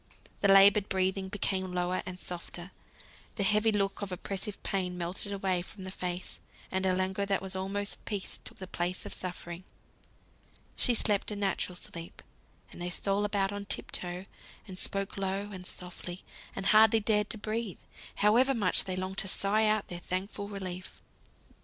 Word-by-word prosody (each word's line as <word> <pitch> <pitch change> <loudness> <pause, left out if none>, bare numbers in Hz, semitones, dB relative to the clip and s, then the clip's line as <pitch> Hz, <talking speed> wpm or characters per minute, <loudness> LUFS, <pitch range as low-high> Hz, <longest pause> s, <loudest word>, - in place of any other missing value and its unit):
The 200 - +3
laboured 195 +1 +7
breathing 190 0 +1
became 190 -2 -1
lower 180 +1 0
and 180 0 -6
softer, 175 +1 -6 0.6
the 200 - 0
heavy 210 +3 +4
look 200 -1 0
of 200 -2 -3
oppressive 195 +2 -4
pain 180 -2 -1
melted 180 +4 -3
away 190 -2 +1
from 190 +2 -9
the 190 - -5
face, 180 -1 -4 0.3
and 190 0 +1
a 185 - +3
languor 190 +2 0
that 195 -1 +2
was 190 0 -1
almost 200 +2 -2
peace 205 -3 -4
took - - -2
the 190 - -6
place 180 0 -2
of - - -5
suffering. 175 -1 -6 1.1
She 245 - +4
slept 210 -3 +2
a 210 - -3
natural 195 -2 0
sleep; 170 -1 -7 0.5
and - - -10
they 175 - -1
stole 200 +3 +1
about 200 -1 +1
on 205 0 -4
tip - - -1
toe, 180 +1 -2 0.4
and 185 -1 -7
spoke 195 0 -1
low, 195 +1 -1
and 185 -2 -7
softly, 180 0 -6 0.3
and 195 - -4
hardly 220 +1 +7
dared 210 -1 +2
to - - -2
breathe, 215 -1 -2 0.4
however 245 +6 +5
much 200 -6 +3
they 185 - -2
longed 185 +1 -3
to - - +2
sigh 210 +3 +4
out 215 -1 +2
their 175 - -5
thankful 190 +3 -3
relief. 185 -2 -6
195 Hz, 170 wpm, -31 LUFS, 185-205 Hz, 1.1 s, laboured